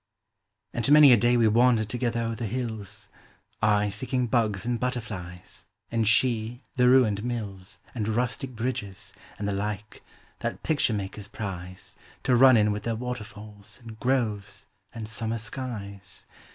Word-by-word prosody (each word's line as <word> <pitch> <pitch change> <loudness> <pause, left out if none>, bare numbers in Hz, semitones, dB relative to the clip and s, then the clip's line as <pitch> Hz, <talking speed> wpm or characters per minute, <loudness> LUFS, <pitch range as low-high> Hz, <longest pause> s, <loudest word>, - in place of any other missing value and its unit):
And 120 +4 0
many 150 -3 +9
a - - +9
day 120 +2 +3
we 115 -2 +4
wandered 115 0 +4
together 120 0 -1
o'er 115 0 -1
the 115 0 -4
hills, 110 -3 -5 0.5
I 105 -1 +3
seeking 125 +5 -1
bugs 110 -5 0
and 120 -1 -1
butterflies, 110 -9 -5 0.2
and 115 -2 +1
she, 120 +1 +2
the 125 -1 +5
ruined 110 -6 +4
mills 105 -6 -5
And 110 -4 -2
rustic 125 +3 -1
bridges, 110 -5 -4 0.2
and 100 - -3
the 100 - 0
like, 105 +1 -4 0.4
that - - -4
picture 145 -7 +1
makers 100 0 -5
prize 95 -4 -7 0.3
To 125 - +3
run 130 0 +7
in 105 -1 +3
with 105 0 -3
their 115 +1 -2
waterfalls, 110 -4 -7
and 110 -1 -10
groves, 115 -6 -1 0.3
and 110 -2 -6
summer 110 +1 -3
skies. 110 -4 -6
115 Hz, 150 wpm, -27 LUFS, 105-125 Hz, 0.5 s, many